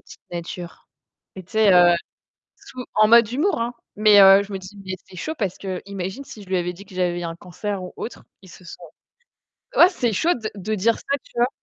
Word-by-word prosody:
petite - - -16
nature». 175 0 -8 0.5
Mais 190 - -7
tu 180 - -22
sais, 220 -2 +4 0.9
sous 250 -1 -10
en 215 0 +5
mode 230 -1 +6
humour 295 +5 0
hein, 240 +1 -2 0.2
mais, 210 -1 +7
heu, 195 +1 +8
je 200 0 -10
me - - -2
dis, 190 +2 -12
mais 190 - -4
c'est 185 - -14
chaud, 310 - -4
parce 195 -5 -2
qu'imagine 190 +4 -6
si 225 -6 -12
je - - -18
lui 190 - 0
avais 175 0 -2
dit 195 +3 -13
que 195 -2 -15
j'avais 175 -1 -1
un 165 -1 -5
cancer 185 +3 -6
ou 180 - -8
autre 235 - -7 0.2
il 185 - -15
se 180 - -15
sent 175 +1 -11 1.0
ouais, 345 - +9
c'est 245 -11 -1
chaud 335 - +2
de 220 -3 -5
de 210 +2 -3
dire 220 +3 +2
ça, 280 - -2
tu - - -22
vois? 240 +1 +3
200 Hz, 220 wpm, -22 LUFS, 185-230 Hz, 1.0 s, ouais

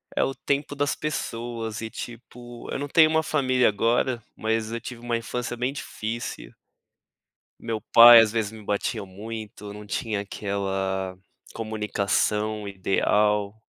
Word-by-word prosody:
é - - +3
o 135 - -1
tempo 145 +1 -2
das 145 0 0
pessoas 115 -6 -4
e 110 - -4
tipo, 120 +1 -9
eu - - -2
não 145 - -3
tenho 155 +2 +6
uma 160 0 +2
família 130 -5 +2
agora, 115 +3 +1
mas 110 0 -1
eu 115 - -3
tive 120 -1 -8
uma 120 -1 -1
infância 120 +1 -4
bem 125 +2 -1
difícil. 115 -4 -5 1.1
Meu 115 -1 -2
pai 115 +3 +9
às 110 -2 +2
vezes 110 -2 -1
me 110 -1 -11
batia 105 +1 -2
muito, 105 +2 -8
eu 100 - -7
não 105 0 -9
tinha 105 0 -2
aquela 95 -2 -3 0.4
comunicação 105 -1 -1
ideal, 100 +1 +1
115 Hz, 145 wpm, -25 LUFS, 105-120 Hz, 1.1 s, pai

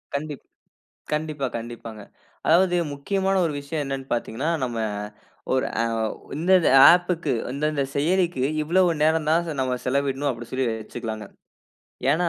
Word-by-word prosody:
கண்டிப் 145 -1 -4 0.7
கண்டிப்பா, 150 -2 -2
கண்டிப்பாங்க. 115 -2 -8 0.5
அதாவது 180 +2 +4 0.2
முக்கியமான 195 +7 -1
ஒரு 155 - -1
விஷயம் 145 +2 -3
என்னனு 135 -1 -4
பார்த்தீங்கனா, 120 +5 -2
நம்ம 120 -2 -2 0.8
ஒரு 130 - +1 0.2
அ - - +2 0.2
ஓ 110 - 0 0.3
இந்தந்த 175 +2 +4 0.2
ஆப்க்கு 175 -3 +1 0.2
இந்தந்த 150 +1 0
செயலிக்கு, 170 -1 +1 0.2
இவ்வளவு 175 +4 +3
நேர 155 +1 +5 0.2
தான் 170 +2 +3
ச 160 - -2
நம்ம 130 -1 0
செலவிடனும் 140 +1 0
அப்படினு 120 -2 -6
சொல்லி 130 0 0
வச்சுக்கலாங்க. 110 -1 -5 0.9
ஏனா, 175 +2 +1
145 Hz, 130 wpm, -24 LUFS, 130-170 Hz, 0.9 s, நேர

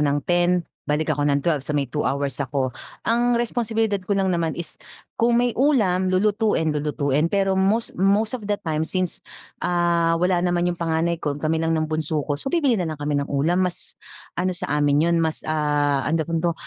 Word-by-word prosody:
nang 145 -1 +1
10 175 0 +2 0.2
balik 155 +1 +1
ako 145 - -2
nang 140 -1 +1
12, 160 -4 +1
so 150 +2 -3
may 140 - +1
2 150 +4 -3
hours 140 0 -2
ako. 135 -1 -1 0.3
Ang 240 +1 +2
responsibilidad 225 -3 0
ko 195 +2 -1
lang 190 -1 +1
naman 165 -2 -1
is, 170 -3 -4 0.3
kung 235 +1 +2
may 245 0 +2
ulam, 210 -10 +2
lulutuin, 200 -4 +1
lulutuin. 150 0 0
Pero 195 +1 +1
most 195 +4 +1
most 200 +3 +2
of 225 -5 -5
the 205 - +1
time 155 -1 -1
since, 185 -2 -1 0.4
ah 170 -1 +2
wala 180 +1 +2
naman 175 0 +1
yung 170 - -10
panganay 165 0 0
ko. 145 -1 -2
Kami 155 +2 -1
lang 165 0 +1
ng 155 - 0
bunso 155 -1 -2
ko, 145 - -2
so - - -3
bibili 290 -5 +2
na 175 - -1
lang 155 - -4
kami 145 0 -2
ng 140 - -4
ulam 155 +6 +1
mas, 180 -2 0 0.4
ano 185 0 -1
sa 170 - -3
amin 145 +1 +3
yun - - +3
mas, 160 -1 -1
ah, 145 -2 +1
anong 160 0 +1
tawag 165 +1 -1
dito, 170 0 +1
170 Hz, 205 wpm, -23 LUFS, 150-195 Hz, 0.4 s, amin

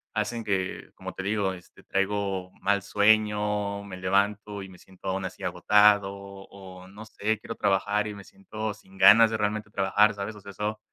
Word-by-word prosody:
hacen 115 -1 -2
que, 95 -3 -3
como - - -8
te - - -6
digo, 100 -1 0
este, 90 - -15
traigo 100 -2 -2
mal 100 0 +1
sueño, 105 0 +1
me 95 -2 -9
levanto 100 +2 0
y - - -9
me 90 - -15
siento 95 0 -13
aún 95 +1 -2
así - - -8
agotado 105 -1 +4
o 95 -1 -12
no 105 +3 -11
sé, 110 0 -2
quiero 115 - -7
trabajar 105 +2 +1
y 105 - -6
me 100 - -10
siento 110 - -6
sin 95 0 -19
ganas 105 +4 +8
de 110 - -2
realmente 105 0 -2
trabajar, 105 +1 +2
¿sabes? 100 +2 -5
O 105 - -13
sea 100 - -10
eso 105 +2 -3
100 Hz, 185 wpm, -26 LUFS, 95-105 Hz, -, ganas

